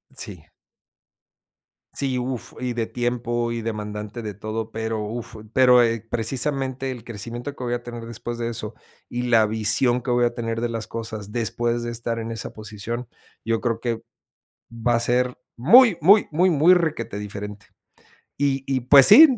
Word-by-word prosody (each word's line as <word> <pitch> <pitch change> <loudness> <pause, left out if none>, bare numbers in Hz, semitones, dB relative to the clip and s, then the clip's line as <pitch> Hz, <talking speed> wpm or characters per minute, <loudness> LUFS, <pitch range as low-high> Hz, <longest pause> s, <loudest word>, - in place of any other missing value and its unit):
Sí. - - -8 1.4
Sí, 135 -2 -1
uf, 125 -1 -4
y 125 -1 -1
de 115 -1 -2
tiempo 120 -1 -2
y 115 0 -3
demandante 105 0 -5
de 105 -2 -5
todo, 110 +2 -5
pero 110 -1 -3
uf, 115 +2 -6 0.2
pero, 125 0 +6
eh, 115 -1 +1
precisamente 130 +3 -1
el 125 -4 -6
crecimiento 120 +4 -6
que 130 - -8
voy 120 - -1
a 120 0 -3
tener 120 -1 -7
después 115 +1 -6
de 115 0 -2
eso 110 -2 -5 0.4
y 120 0 -3
la 115 -3 +4
visión 110 +3 +3
que 125 - -6
voy 120 0 +3
a 120 0 +1
tener 115 -1 -3
de 120 - -1
las 115 -2 -4
cosas 110 -2 -6
después 120 0 -1
de 120 - -3
estar 115 0 -3
en 115 0 -5
esa 115 - -5
posición, 110 +3 -6 0.3
yo 115 0 0
creo 115 -1 -2
que 115 -2 -2 0.7
va 115 +1 0
a - - 0
ser, 125 +1 +1 0.2
¡muy, 220 - +7
muy, 200 +6 +6
muy, 175 +5 +3
muy! 165 +3 +6
Requetediferente. 105 - -4 0.7
Y 135 -1 0
y 135 -1 0
pues 135 +2 +8
sí, 275 +10 +11
120 Hz, 170 wpm, -23 LUFS, 115-125 Hz, 1.4 s, sí